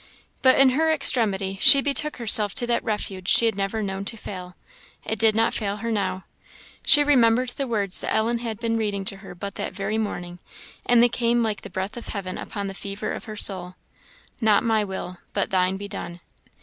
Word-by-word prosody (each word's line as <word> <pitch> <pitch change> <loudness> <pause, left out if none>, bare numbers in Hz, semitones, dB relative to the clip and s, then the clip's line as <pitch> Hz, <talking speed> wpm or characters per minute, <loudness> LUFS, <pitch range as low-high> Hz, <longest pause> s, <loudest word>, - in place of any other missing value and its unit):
But 260 -1 +4
in 270 -1 +5
her 320 +4 +1
extremity 200 -10 +3
she 275 - +9
betook 285 +2 -1
herself 215 -3 +5
to 240 - +2
that 240 0 -1
refuge 195 -4 -5
she 235 - +6
had 225 -3 0
never 200 +2 -3
known 195 0 -5
to 225 - -5
fail: 180 -3 -9 0.5
it 220 - -4
did 220 0 +3
not 225 +1 +1
fail 200 -2 -3
her 230 +2 -5
now. 190 -3 -3 0.6
She 295 - +5
remembered 250 -3 +2
the 270 +2 -5
words 205 -5 +3
Ellen 230 +2 -1
had 230 -2 -5
been 230 -1 -2
reading 205 -3 -3
to 195 - -1
her 195 -2 -12
but 200 +2 -7
that - - -5
very 205 +3 -3
morning, 175 -4 -6 0.5
and 240 -1 +4
they - - +5
came 235 0 0
like 215 -2 -3
the - - -10
breath 190 +5 -5
of 240 - -9
heaven 195 -2 -6
upon 200 -1 -6
the 195 - -6
fever 200 +2 -6
of - - -8
her 215 -1 -9
soul 185 -3 0 0.7
"Not 215 -1 +3
my 220 -2 +1
will, 190 -2 -7
but 200 - -2
thine 185 0 0
be 200 +1 -8
done." 175 -3 -8
210 Hz, 205 wpm, -23 LUFS, 195-230 Hz, 0.7 s, she